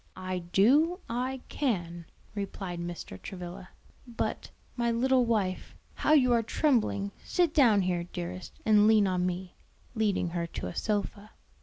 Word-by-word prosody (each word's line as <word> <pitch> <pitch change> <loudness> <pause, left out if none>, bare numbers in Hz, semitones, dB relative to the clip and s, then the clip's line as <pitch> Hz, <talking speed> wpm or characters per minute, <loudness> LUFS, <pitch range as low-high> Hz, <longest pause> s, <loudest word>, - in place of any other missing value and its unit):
"I 185 0 -3
do; 250 - +3
I 250 +2 -2
can," 175 - -2 0.3
replied 195 -3 -5
Mr. 170 - -7
Travilla. 180 0 -8 0.4
"But, 235 - -3 0.3
my 235 -1 0
little 250 +2 +3
wife, 205 -5 -1 0.2
how 305 - +2
you 255 -5 +5
are 235 - +4
trembling! 220 - +1
Sit 350 -4 +1
down 230 - +5
here, 175 -1 -1
dearest, 180 +1 -6
and 210 -1 +5
lean 215 -2 +5
on 180 -1 +1
me," 180 0 -4 0.4
leading 210 -6 0
her 170 0 -2
to - - -6
a 90 - -5
sofa. 205 0 -2
200 Hz, 145 wpm, -29 LUFS, 180-240 Hz, 0.4 s, you